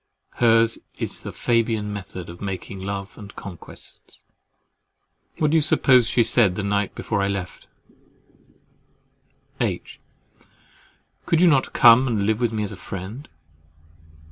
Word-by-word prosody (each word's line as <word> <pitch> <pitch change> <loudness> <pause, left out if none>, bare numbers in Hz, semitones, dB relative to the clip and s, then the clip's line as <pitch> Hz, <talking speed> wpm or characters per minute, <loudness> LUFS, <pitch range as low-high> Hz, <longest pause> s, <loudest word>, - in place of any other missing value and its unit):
Hers 115 -1 +3 0.2
is - - -4
the - - -7
Fabian 115 -3 0
method 95 -3 -7
of 85 +1 -11
making 95 0 -5
love 100 0 -6
and 100 -1 -11
conquests. 90 -4 -10 1.1
What 150 -2 +1
do 165 - +4
you - - +4
suppose 130 -4 +4
she 120 - +3
said 105 -6 +3
the 105 - -3
night 100 0 -1
before 105 -3 -2
I 100 - +1
left 100 -2 -5 1.9
her? - - +2
"H. - - -7 1.3
Could 165 - +3
you 180 - +5
not 140 -5 +2
come 120 +3 +7
and 110 -5 0
live 110 +2 0
with 120 -2 +1
me 110 -1 -2
as 105 - -4
a - - -7
friend? 95 +10 -8
105 Hz, 145 wpm, -23 LUFS, 100-120 Hz, 1.9 s, come